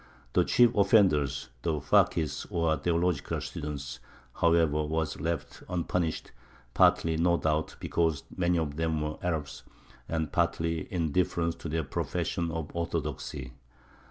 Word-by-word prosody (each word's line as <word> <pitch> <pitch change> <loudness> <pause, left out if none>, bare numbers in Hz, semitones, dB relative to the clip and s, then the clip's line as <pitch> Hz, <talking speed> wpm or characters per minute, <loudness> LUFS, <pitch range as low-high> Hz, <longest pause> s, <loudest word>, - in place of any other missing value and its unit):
The - - +4
chief 120 -1 +5
offenders, 75 - +3
the 80 0 0
fakis, 75 +2 +2
or 85 -2 +1
theological 85 +3 0
students, 70 -3 -5 0.4
however, 80 -3 +3
were 80 +1 0
left 80 -2 -3
unpunished, 85 -2 -1 0.4
partly, 80 -1 +4
no 85 +1 +3
doubt, 80 -1 0
because 80 -4 0
many 90 -1 +2
of 75 -3 -2
them 80 -1 0
were 75 0 -3
Arabs, 75 -7 -3 0.5
and 80 -2 -1
partly 85 -1 0
in 85 -4 -1
deference 85 -1 +1
to 85 - -6
their 80 +1 -1
profession 85 +2 -2
of 80 -1 -5
orthodoxy. 70 -6 -3
80 Hz, 130 wpm, -29 LUFS, 75-85 Hz, 0.5 s, chief